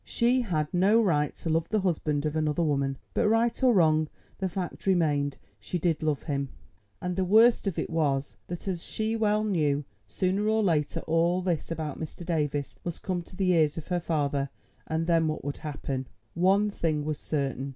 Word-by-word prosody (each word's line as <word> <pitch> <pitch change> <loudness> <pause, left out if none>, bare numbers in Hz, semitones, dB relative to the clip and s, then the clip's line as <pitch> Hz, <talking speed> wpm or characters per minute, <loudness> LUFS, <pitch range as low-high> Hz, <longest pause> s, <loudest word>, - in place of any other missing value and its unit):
She 245 +2 +2
had 155 -9 -1
no 195 +5 +4
right 150 -9 +2
to 165 - -5
love 165 0 +1
the 215 -1 +1
husband 155 -5 0
of 155 0 -1
another 155 +1 +1
woman. 140 -3 0 0.2
But - - +2
right 230 +2 +2
or 255 -1 +5
wrong 155 -6 +3 0.3
the 190 -1 -1
fact 180 +1 -5
remained: 150 -6 +2 0.2
she 105 - -3
did 165 -2 0
love 155 -2 0
him. 140 -3 -2 0.5
And 180 0 -3
the 190 - +1
worst 220 +4 +5
of 190 - -1
it - - -1
was 145 -4 0
that, 175 +2 -6
as 180 -3 -2
she 220 +4 -2
well 215 -1 +2
knew, 150 -8 +1 0.2
sooner 185 - 0
or 220 0 +2
later 155 -6 +1
all 170 +3 +1
this 175 -4 -1
about 155 -3 -4
Mr. 160 +2 -7
Davies 150 -4 -1
must 175 -2 -5
come 180 -2 -1
to 170 - -14
the 185 -1 +2
ears 155 -3 +3
of 165 - -7
her 180 -1 +1
father, 145 -4 -1 0.4
and 160 +1 -1
then 165 -1 +3
what 155 -2 -3
would 145 - -3
happen? 135 -3 -4 0.3
One 195 +4 +3
thing 155 -6 -1
was 155 -1 -2
certain. 140 -2 -2
165 Hz, 195 wpm, -28 LUFS, 150-190 Hz, 0.5 s, or